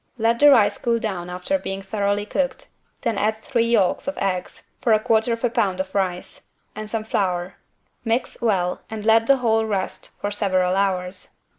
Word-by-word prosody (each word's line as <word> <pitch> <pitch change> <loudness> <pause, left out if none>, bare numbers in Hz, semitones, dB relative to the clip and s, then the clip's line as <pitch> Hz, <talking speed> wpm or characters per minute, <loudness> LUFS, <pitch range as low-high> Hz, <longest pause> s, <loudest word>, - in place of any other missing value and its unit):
Let 230 +1 +1
the 290 - +8
rice 210 -7 +5
cool 235 -1 +1
down 190 -6 -4
after 180 +11 -1
being 195 -4 -5
thoroughly 205 +1 -1
cooked, 265 +4 -2 0.3
then 230 -5 -1
add 215 +1 +1
three 230 +1 0
yolks 220 -3 +2
of 280 - -3
eggs 185 -2 -3
(for 225 -3 +4
1/4 220 +2 +1
lb. 195 -5 0
of 190 0 -3
rice) 185 -3 -3 0.3
and 215 0 -6
some 220 0 -2
flour. 180 -4 -1 0.5
Mix 235 +2 -1
well 190 -6 0
and 215 -1 -6
let 225 0 +4
the 275 - +6
whole 225 -3 +2
rest 200 -3 -3
for 205 - -2
several 185 -3 +1
hours. 190 -1 -2
210 Hz, 170 wpm, -22 LUFS, 190-230 Hz, 0.5 s, the